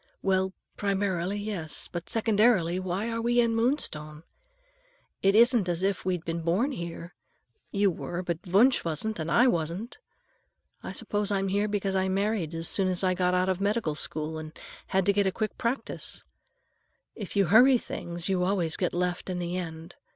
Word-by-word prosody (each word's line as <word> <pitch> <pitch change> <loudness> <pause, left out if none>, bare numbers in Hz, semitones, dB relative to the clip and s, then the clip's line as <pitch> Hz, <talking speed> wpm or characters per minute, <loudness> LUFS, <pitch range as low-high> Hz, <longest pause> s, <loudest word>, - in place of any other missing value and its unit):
"Well, 190 0 +1 0.3
primarily, 195 -2 -1
yes. 200 -7 -4
But 175 -1 -7
secondarily, 215 -5 +3
why 185 +4 -2
are 230 0 -2
we 240 +1 +2
in 235 -1 +3
Moonstone? 155 - 0 1.0
It 195 +1 +3
isn't 235 -4 +5
as 175 +1 -1
if 195 -1 0
we'd 180 -3 -2
been 165 0 -3
born 185 - +1
here. 170 -5 -6 0.6
You 200 -1 +2
were, 175 +1 -5
but 170 -2 -2
Wunsch 220 +9 +4
wasn't, 170 +6 -1
and 160 +1 -3
I 240 - +5
wasn't. 175 +1 -1 0.8
I - - -6
suppose 205 -1 -2
I'm 195 -1 0
here 205 +2 +1
because 205 -2 -1
I 190 0 +1
married 195 -4 -1
as 165 0 +1
soon 195 -2 +2
as 185 0 0
I 185 -1 +3
got 180 0 +1
out 180 0 +2
of 190 0 -1
medical 205 -5 0
school 155 +1 -4
and 155 0 -9 0.3
had 190 -1 +1
to 200 - +4
get 200 -1 +2
a - - +2 0.2
practice 235 +6 -3
quick. - - -42 0.9
If 200 - -5
you 200 -1 +4
hurry 245 +9 +6
things, 170 -6 -4
you 185 -2 +1
always 180 -4 +1
get 180 - -1
left 180 +1 -2
in 180 - -2
the 175 0 -3
end. 165 -2 -6
190 Hz, 180 wpm, -28 LUFS, 170-205 Hz, 1.0 s, hurry